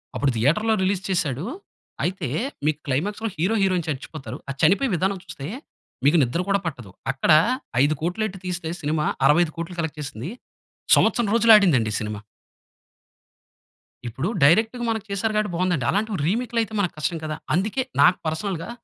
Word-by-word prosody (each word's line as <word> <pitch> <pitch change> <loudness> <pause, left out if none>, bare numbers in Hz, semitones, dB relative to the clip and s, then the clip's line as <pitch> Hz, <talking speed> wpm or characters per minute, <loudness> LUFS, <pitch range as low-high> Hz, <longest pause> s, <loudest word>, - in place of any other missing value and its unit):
అప్పుడు 140 -1 +1
థియేటర్‌లో 165 - +2
రిలీజ్ 190 0 0
చేసాడు. 150 -5 -1 0.6
అయితే 185 -5 -2 0.4
మీకు 155 0 +1
క్లైమాక్స్‌లో 205 +12 -1
హీరో, 185 +8 +1
హీరోయిన్ 185 -4 +1
చచ్చిపోతారు. 135 -4 -6
ఆ - - 0
చనిపోయే 200 - +4
విధానం 190 +3 0
చూస్తే 140 - -7 0.6
మీకు 150 +4 +5
నిద్ర 130 +8 -1
కూడా 200 0 +3
పట్టదు. 125 - -6 0.2
అక్కడ 135 +4 +1 0.5
5,00,00,000 160 +8 0
ఎట్టి 190 -2 -9
తీస్తే 175 -2 -3
సినిమా 150 0 0 0.2
65,00,00,000 170 +3 +1
కలెక్ట్ 160 -2 -3
చేసింది. 140 - -6 0.7
సంవత్సరం 235 -4 +2
రోజులాడిందండి 200 - +5
సినిమా. 105 -1 -5 1.9
ఇప్పుడు 120 +8 -3 0.2
డైరెక్ట్‌గా 220 - +4
మనకి 220 -2 -2
చేసారు 200 +3 -1
కాబట్టి 210 -2 0
బావుందండి. 175 -7 0
అలాంటివి 210 0 -1
రీమేక్‌లు 235 +4 0
అయితే 220 -1 -4
మనకు 185 -4 0
కష్టం 165 +2 -2
కదా! 155 0 -3 0.2
అందుకే 210 +9 0 0.2
నాకు 180 - +6
పర్సనల్‌గా 165 +2 -3
175 Hz, 140 wpm, -23 LUFS, 150-200 Hz, 1.9 s, నాకు